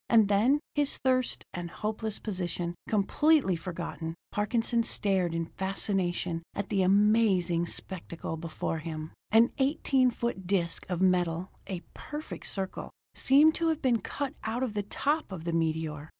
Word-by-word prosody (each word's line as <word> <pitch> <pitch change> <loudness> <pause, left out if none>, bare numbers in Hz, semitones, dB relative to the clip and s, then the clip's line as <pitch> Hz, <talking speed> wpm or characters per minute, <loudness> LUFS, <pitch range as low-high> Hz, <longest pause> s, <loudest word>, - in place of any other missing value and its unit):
And 220 -3 +5
then, 240 +9 +4
his 290 -1 +1
thirst 255 -1 +1
and 175 -1 -4
hopeless 215 +2 -2
position 175 -4 -3 0.2
completely 225 - +3
forgotten, 165 -1 -5 0.2
Parkinson 230 +3 +1
stared 190 -6 0
in 165 0 -1
fascination 185 -2 -1
at 200 -1 -3
the 200 -2 +2
amazing 190 -3 +3
spectacle 170 -2 -4
before 165 0 -3
him. 155 -1 -6 0.2
An 225 +3 +5
eighteen 265 -2 +3
foot 235 -6 -3
disc 180 -2 0
of 180 -1 -1
metal, 180 -1 +1 0.2
a 185 -3 -4
perfect 300 +1 -7
circle, 190 -1 -3 0.2
seemed 295 +4 +5
to 335 - 0
have 320 -1 0
been 240 -4 +3
cut 280 +7 -3
out 225 +3 -1
of 245 -5 -2
the 205 - 0
top 290 +7 -1
of 175 -4 -6
the 170 0 -2
meteor. 160 -2 -1
195 Hz, 150 wpm, -29 LUFS, 170-235 Hz, 0.2 s, And